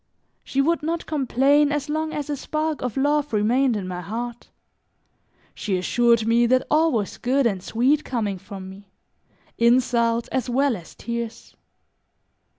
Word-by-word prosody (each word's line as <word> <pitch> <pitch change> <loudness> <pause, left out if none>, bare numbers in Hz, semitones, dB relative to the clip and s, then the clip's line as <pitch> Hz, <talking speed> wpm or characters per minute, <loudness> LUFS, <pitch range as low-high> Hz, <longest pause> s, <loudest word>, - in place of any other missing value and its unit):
She 275 - 0
would 330 +4 +1
not 330 +2 -2
complain 285 0 +2
as 290 0 -2
long 310 +1 -2
as 295 -2 -4
a 295 - -2
spark 305 +2 -3
of 250 0 -3
love 290 +1 +1
remained 235 +3 +2
in 190 -3 -5
my 180 -1 -5
heart; 235 +4 -6 1.0
she 195 -4 -2
assured 235 +4 +2
me 235 +1 +3
that 255 +1 +2
all 320 +2 +4
was 215 -6 -2
good 265 +2 +1
and 195 -5 0
sweet 260 +10 +1
coming 210 -6 -2
from 190 0 -9
me, 195 +1 -13 0.7
insults, 235 -1 +2
as 260 -2 -2
well 270 +1 +2
as 170 -5 -12
tears. 235 -1 -6
245 Hz, 155 wpm, -23 LUFS, 225-285 Hz, 1.0 s, all